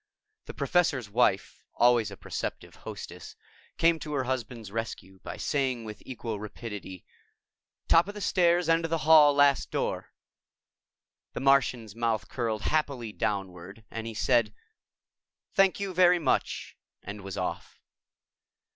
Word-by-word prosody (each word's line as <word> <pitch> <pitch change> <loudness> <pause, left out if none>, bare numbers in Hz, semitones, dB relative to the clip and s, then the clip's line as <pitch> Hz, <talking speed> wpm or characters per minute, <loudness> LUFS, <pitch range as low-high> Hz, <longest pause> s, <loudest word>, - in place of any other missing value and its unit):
The - - -9
Professor's 145 - +1
Wife, 105 -4 +1
always 120 -3 +4
a 100 - -10
perceptive - - -5
hostess, - - -9 0.4
came 165 0 +3
to 150 -1 -6
her 135 -2 0
husband's 120 -4 -4
rescue 100 -4 -6
by - - -7
saying 130 -5 -1
with 105 -1 -8
equal 115 -4 -5
rapidity, 105 -3 -8 0.8
"Top 165 +2 +5
of 205 - -7
the - - -6
stairs, 175 -2 +2
end 165 0 +3
of 165 - -2
the 165 - +1
hall, 155 -2 +8
last 145 -1 +4
door." - - -3 1.2
The - - -4
Martian's 125 -6 +2
mouth 115 -2 -1
curled 115 -4 -2
happily 140 -7 -1
downward 95 0 -4
and 115 0 -5
he 115 - -6
said, 115 -2 +2 1.0
"Thank 195 -1 +3
you 200 -2 -3
very 180 0 +5
much," 165 - -1 0.3
and 100 +1 -7
was 95 -1 -7
off. - - -4
120 Hz, 140 wpm, -28 LUFS, 105-155 Hz, 1.2 s, hall